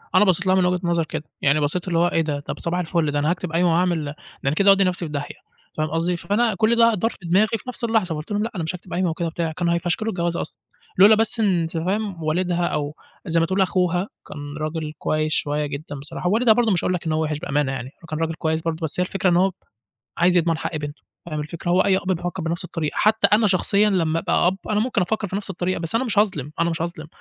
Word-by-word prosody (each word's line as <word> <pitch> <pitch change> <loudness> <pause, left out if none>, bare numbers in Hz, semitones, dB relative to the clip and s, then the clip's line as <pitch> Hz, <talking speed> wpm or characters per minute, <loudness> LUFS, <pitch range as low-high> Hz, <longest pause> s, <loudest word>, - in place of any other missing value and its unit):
أنا 210 - +6
بصّيت 185 0 +2
لها 185 - +4
من 185 -1 +3
وجهة 180 0 +1
نظر 170 -2 +1
كده، 155 -1 -5 0.2
يعني 140 +2 +3
بصّيت 160 +6 -1
اللي 170 -2 +1
هو 175 - +4
إيه 165 - +1
ده! 150 -2 -2
طَب 145 - -6
صباح 175 +2 -1
الفُلّ 165 -3 0
ده 145 - 0
أنا 150 +2 +1
هاكتب 180 -1 -2
قايمة 170 +1 +2
وهاعمل 170 -3 +1
ده 145 +1 -6 0.3
أنا 135 - +2
كده 200 +2 +4
هاودِّي 195 0 +6
نفسي 180 -1 0
في 150 - -7
داهية، 145 -1 -5 0.4
فاهم 155 0 0
قصدي؟ 170 +2 0
فأنا 215 +3 +1
كُلّ 225 +2 +3
ده 230 -1 +5
دار 225 +5 0
في - - -12
دماغي 190 +6 +3
في - - -16
نفس 250 - -6
اللحظة 220 -8 +1
فقلت 150 +7 -7
لهم 205 +1 0
لأ 230 - -3
أنا 170 - -2
مش 160 +3 -3
هاكتب 180 0 -10
قايمة 180 -1 +1
وكده 165 +1 -2
وبتاع، 165 0 -2
كانوا 170 +1 0
هيفشكلوا 175 +6 -1
الجوازة 170 -1 -1
أصلًا، 120 -6 -8 0.4
لولا 205 +3 +8
بس 225 +1 +2
أنت 175 -6 +1
فاهم 190 0 -2
والدها 175 +2 0
أو 150 +1 -2 0.3
زي 165 -1 +1
ما 165 - +3
تقول 190 +3 0
أخوها 180 0 +1 0.2
كان 145 0 -7
راجل 155 0 -3
كويس 155 0 0
شوية 150 0 0
جدًا 145 +1 -6
بصراحة، 145 +5 -4
ووالدها 225 +2 +5
برضه 230 -2 +2
مش 175 - +1
هاقول 180 - +1
لك 175 - -3
إن 160 - -1
هو 155 0 +1
وحش 150 -1 -2
بأمانة 145 -4 0
يعني، 130 -1 -5
هو - - -12
كان 155 0 -3
راجل 165 0 -1
كويس 160 0 -1
برضه، 165 -1 -2
بس 160 +3 -2
هي 180 - +2
الفكرة 195 0 0
إن 175 - +3
هو 190 +1 +3 0.7
عايز 175 +1 +4
يضمن 165 -1 +1
حق 160 - -3
بنتُه، 145 0 -6 0.2
فاهم 155 -2 -3
الفكرة 170 +3 -4
هو 180 +1 +4
أي 190 -1 +3
أب 190 0 -1
بيفكّر 175 +1 -3
بنفس 170 +2 -2
الطريقة، 160 -4 -3
حتى 215 +1 +4
أنا 215 0 +5
شخصيًا 200 +2 +3
لمّا 165 -4 +1
أبقى 175 - +1
أب، 185 +2 +2
أنا 210 0 +2
ممكن 235 -4 0
أفكّر 210 +1 -1
في 190 - -3
نفس 200 -1 -4
الطريقة، 180 +1 -2
بس 165 +5 -2
أنا 250 +3 +2
مش 215 -4 -1
هاظلم، 155 -9 +1
أنا 170 0 +2
مش 165 0 -2
هاظلم، 170 -2 -5
175 Hz, 260 wpm, -22 LUFS, 160-190 Hz, 0.7 s, لولا